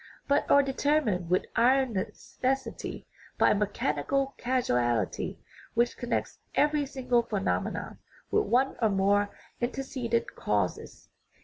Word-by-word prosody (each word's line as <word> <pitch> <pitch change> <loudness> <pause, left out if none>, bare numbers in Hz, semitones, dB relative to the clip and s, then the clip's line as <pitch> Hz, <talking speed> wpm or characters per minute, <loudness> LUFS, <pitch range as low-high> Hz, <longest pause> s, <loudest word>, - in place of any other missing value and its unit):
Both 285 +1 +2
are 280 - +6
determined 270 - +1
with 180 - +2
iron 255 +1 +4
neces 190 - -6
sity 265 +1 -2 0.3
by - - +5
a - - +5
mechanical 210 - 0
causality 125 - 0 0.4
which 235 +1 +2
connects 240 - -3 0.2
every 295 -1 +2
single 250 -3 +1
phenomenon 205 -4 -2 0.3
with 425 0 +3
one 265 +3 +2
or 220 - +4
more 200 +1 +2 0.3
antecedent 240 -2 -2
causes. - - -2
240 Hz, 115 wpm, -29 LUFS, 205-270 Hz, 0.4 s, are